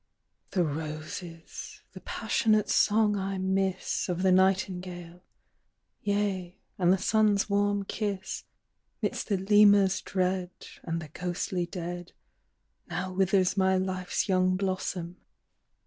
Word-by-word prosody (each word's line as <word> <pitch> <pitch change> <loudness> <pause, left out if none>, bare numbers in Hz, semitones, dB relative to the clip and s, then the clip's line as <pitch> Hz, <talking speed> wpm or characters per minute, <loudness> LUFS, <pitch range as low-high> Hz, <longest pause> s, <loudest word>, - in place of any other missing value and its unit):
"The 180 - +1
roses, 155 +2 -6
the - - -9
passionate 215 -2 +1
song 210 0 +3
I 195 0 -2
miss 190 0 -1
Of 180 +1 -1
the 190 - +4
nightingale; 180 -2 0 0.8
yea, 200 -3 -1 0.2
and 180 -1 +4
the 190 - +4
sun's 210 0 +2
warm 205 0 +1
kiss. 200 -2 -3 0.6
Midst - - -1
the 200 - +2
Lemur's 200 0 +5
dread, 185 -1 -1 0.3
And 165 -1 -3
the 155 - -10
ghostly 180 +2 -3
dead, 175 -1 -6 0.8
Now 185 +2 -3
withers 190 0 +2
my 190 -1 +3
life's 185 +1 -1
young 185 -1 +3
blossom. 185 -2 -3
185 Hz, 115 wpm, -28 LUFS, 180-195 Hz, 0.8 s, Lemur's